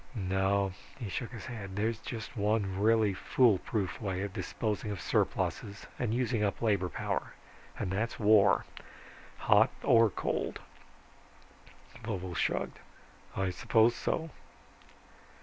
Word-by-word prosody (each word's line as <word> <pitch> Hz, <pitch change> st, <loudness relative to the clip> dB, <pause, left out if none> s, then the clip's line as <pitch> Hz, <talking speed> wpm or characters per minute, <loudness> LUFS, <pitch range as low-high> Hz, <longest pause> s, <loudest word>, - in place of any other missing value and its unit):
No," 95 Hz, -1 st, +1 dB, 0.2 s
he 115 Hz, -6 st, -5 dB
shook 115 Hz, +6 st, -3 dB
his 115 Hz, -6 st, -8 dB
head, 100 Hz, -6 st, -7 dB
"there's 110 Hz, +2 st, 0 dB
just 115 Hz, -1 st, -7 dB
one 105 Hz, -3 st, 0 dB
really 110 Hz, -1 st, +4 dB
foolproof 105 Hz, -2 st, +1 dB
way 95 Hz, -2 st, -2 dB
of 100 Hz, -2 st, -5 dB
disposing 105 Hz, +2 st, -3 dB
of 100 Hz, -3 st, -4 dB
surpluses 100 Hz, 0 st, -1 dB
and 120 Hz, -3 st, 0 dB
using 120 Hz, -2 st, 0 dB
up 100 Hz, -, 0 dB
labor 100 Hz, -5 st, +1 dB
power -, -, -3 dB, 0.4 s
and 90 Hz, -, -2 dB
that's 110 Hz, +5 st, -2 dB
war 105 Hz, -2 st, +5 dB, 0.7 s
hot -, -, +5 dB
or 115 Hz, -1 st, +6 dB
cold." -, -, -2 dB, 1.4 s
Vovo 95 Hz, -5 st, -4 dB
shrugged, -, -, -1 dB, 0.6 s
"I 95 Hz, -1 st, 0 dB
suppose 115 Hz, +5 st, +3 dB
so." 160 Hz, -1 st, -2 dB
105 Hz, 120 wpm, -31 LUFS, 95-115 Hz, 1.4 s, or